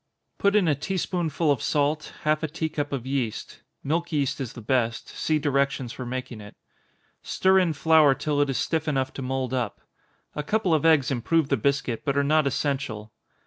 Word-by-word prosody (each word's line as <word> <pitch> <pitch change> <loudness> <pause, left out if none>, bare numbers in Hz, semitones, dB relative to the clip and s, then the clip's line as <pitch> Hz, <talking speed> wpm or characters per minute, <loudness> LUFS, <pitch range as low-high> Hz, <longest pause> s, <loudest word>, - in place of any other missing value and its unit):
Put 200 +1 +3
in 200 -5 +4
a 155 - +4
tea 150 +7 -3
spoonful 170 -3 0
of 140 - 0
salt, 150 +1 0
half 155 0 +2
a 160 - -1
tea 160 +1 -3
cup 145 -2 -3
of 135 -3 -3
yeast, 130 -5 -3 0.2
(milk 165 +4 -1
yeast 140 -2 -1
is 130 - -5
the - - -9
best, 115 0 -1
see 155 - 0
directions 140 -4 0
for 125 - -7
making 125 -3 -5
it) 105 0 -12 0.7
stir 190 0 +3
in 175 -4 +1
flour 155 -1 +5
till 145 0 0
it 145 - +1
is 135 - -1
stiff 160 -1 -1
enough 135 -3 0
to - - -6
mould 130 -1 -2
up. 125 -5 -2 0.5
A 150 - -3
couple 195 +2 0
of 155 +1 +3
eggs 150 -5 +4
improve 140 +5 +1
the - - +3
biscuit, 135 -3 -1
but 140 -1 -1
are 140 - +3
not 155 0 +3
essential. 135 -6 -2
145 Hz, 200 wpm, -25 LUFS, 130-155 Hz, 0.7 s, flour